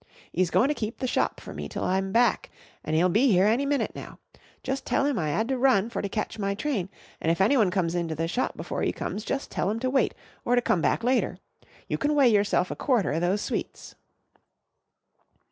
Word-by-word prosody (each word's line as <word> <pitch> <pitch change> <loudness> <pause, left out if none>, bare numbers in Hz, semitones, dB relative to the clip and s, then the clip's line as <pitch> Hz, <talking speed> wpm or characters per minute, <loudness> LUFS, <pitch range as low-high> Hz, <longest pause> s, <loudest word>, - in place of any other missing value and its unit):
'E's 180 0 +1
goin' 245 - +3
to 295 - +1
keep 225 -5 -4
the 260 - -3
shop 250 - 0
for - - -9
me - - -6
till - - -4
I'm 190 +1 0
back 235 +1 +2 0.3
an' 155 - -2
'e'll 170 +3 +4
be 215 +2 +3
'ere 185 - +5
any 240 +7 +2
minute 285 -1 0
now. - - -9 0.5
Jus' 270 +1 -2
tell 275 - 0
'im 280 -6 0
I 155 -3 -1
'ad 220 +10 0
to 265 -1 0
run 235 -4 +3
for - - -2
to 200 - -3
catch 215 +1 -4
my 200 -1 -1
train 215 -5 -2 0.3
an' 160 - 0
if 165 - +1
anyone 215 0 +4
comes 180 -3 0
into 170 -2 -2
the 165 +2 -1
shop 250 +9 -2
before - - -4
'e - - +1
comes 210 - -4
jus' 270 +4 -2
tell - - -2
'em 220 +2 -2
to 255 - 0
wait 270 - +1 0.3
or 245 - +2
to - - +4
come 175 - +1
back 230 - +1
later. 255 +2 +1 0.5
You - - -2
can 295 +1 +1
weigh 275 -4 +5
yourself 205 -4 +2
a - - -3
quarter 240 - +1
o' 160 - 0
those 185 +4 0
sweets." - - -5
215 Hz, 230 wpm, -26 LUFS, 185-255 Hz, 0.5 s, ere